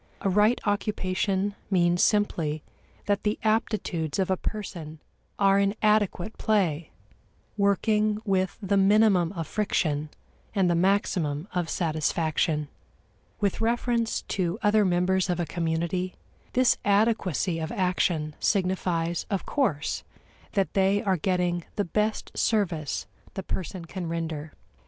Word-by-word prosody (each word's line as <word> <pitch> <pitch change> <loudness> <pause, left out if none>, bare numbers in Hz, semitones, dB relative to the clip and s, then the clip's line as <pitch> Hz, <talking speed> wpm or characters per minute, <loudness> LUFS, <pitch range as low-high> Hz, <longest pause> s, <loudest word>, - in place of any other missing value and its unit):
A 195 - +1
right 210 +5 +4
occupation 200 -1 0 0.2
means 175 -2 +3
simply 165 -8 +1 0.4
that 205 -1 +1
the 210 0 0
aptitudes 215 -8 0
of 190 -1 +1
a - - +3
person 175 -7 -6 0.4
are 195 0 +4
in 200 +1 +1
adequate 215 -2 +1
play, 175 -8 +1 0.7
working 210 +1 +2
with 190 -2 0
the 200 +1 +2
minimum 195 -3 +4
of 165 -4 -4
friction 155 -8 -1 0.5
and 195 -3 +3
the 175 - +3
maximum 170 -4 +1
of 175 -2 -1
satisfaction. 155 -1 0 0.7
With 200 +1 0
reference 235 0 0
to 180 0 -1
other 210 0 +4
members 185 +1 +2
of 175 -1 0
a 175 - 0
community, 170 +2 -2 0.4
this 255 -1 +4
adequacy 200 - +1
of 160 0 -4
action 175 -5 0
signifies, 180 -3 0
of 195 -3 -2
course, 160 - -1 0.5
that 195 -3 0
they 195 +1 +2
are 195 -2 +2
getting 180 0 0
the 205 - 0
best 210 +5 -1
service 175 -9 0 0.3
the 190 - -4
person 185 -1 -5
can 175 0 -5
render. 160 -2 -4
185 Hz, 125 wpm, -27 LUFS, 170-205 Hz, 0.7 s, right